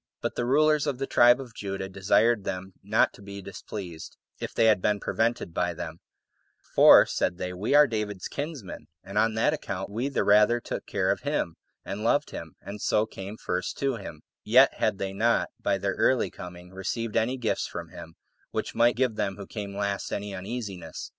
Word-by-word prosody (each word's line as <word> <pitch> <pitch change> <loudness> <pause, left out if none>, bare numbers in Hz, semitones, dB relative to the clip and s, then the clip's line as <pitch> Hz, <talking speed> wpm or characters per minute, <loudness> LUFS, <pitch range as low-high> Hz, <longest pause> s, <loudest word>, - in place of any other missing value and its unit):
But - - -2
the 120 - -2
rulers 150 +2 +3
of 140 -3 -1
the 135 - -2
tribe 120 0 +5
of 125 -4 -9
Judah 95 -2 -4
desired 105 +3 +2
them 95 0 -5
not - - +2
to - - -15
be 100 0 -8
displeased, 95 -3 -8 0.2
if - - -4
they 115 - +2
had 105 -4 +4
been 105 +1 +1
prevented 115 -7 -1
by 90 0 -1
them; - - -6 0.7
for, - - +9
said 85 - -1
they, 90 0 -4
"We 105 +9 0
are 150 0 +8
David's 105 -6 -3
kinsmen, 145 - -6 0.2
and 100 +2 -2
on 110 0 +2
that 115 +7 +2
account 95 -9 -4
we 120 +6 -1
the 140 - 0
rather 105 +3 +5
took - - -6
care - - +1
of - - -1
him, 85 - -1 0.3
and 105 +2 -5
loved 145 +6 +2
him, 80 -2 -8
and 100 +1 -7
so 105 - +2
came 100 0 -8
first 90 -3 -3
to 135 -3 0
him;" 80 -7 -9 0.2
yet - - +6
had - - 0
they 95 0 -3
not, 115 +4 +2
by - - +1
their 100 0 -1
early 130 -2 +2
coming, 90 0 -10
received 105 +4 -3
any 115 +3 +1
gifts 120 -3 -1
from - - -7
him, 80 - -11 0.3
which - - -3
might 120 +1 +4
give 125 -3 0
them 95 -1 -1
who 100 0 -8
came 100 -2 -6
last 100 -1 -2
any 100 0 -4
uneasiness. 95 -4 -6
105 Hz, 200 wpm, -27 LUFS, 95-120 Hz, 0.7 s, for